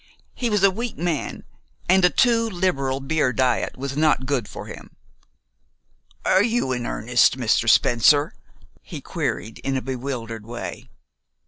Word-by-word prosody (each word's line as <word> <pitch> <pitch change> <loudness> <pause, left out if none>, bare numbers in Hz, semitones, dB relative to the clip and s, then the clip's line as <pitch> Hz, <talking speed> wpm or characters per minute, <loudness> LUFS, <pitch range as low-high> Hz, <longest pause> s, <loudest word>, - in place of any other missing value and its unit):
He 240 - -2
was 210 -3 +1
a 195 - +6
weak 230 +4 -5
man, 165 -3 -3 0.4
and 190 +1 +4
a 180 - +6
too 230 +1 +2
liberal 140 -9 -1
beer 140 -1 0
diet 130 +2 0
was 135 +1 -5
not 150 -3 +2
good 130 -6 -1
for - - -8
him. - - -11 1.3
"Are 190 - +4
you 225 - 0
in 125 -1 -2
earnest, 120 +2 +2
Mr. 115 -2 +1
Spencer?" 145 +7 +4 0.5
he - - -8
queried 110 +1 -4
in 135 -1 -2
a - - -2
bewildered 120 -4 -5
way. 120 0 -7
140 Hz, 145 wpm, -23 LUFS, 125-185 Hz, 1.3 s, a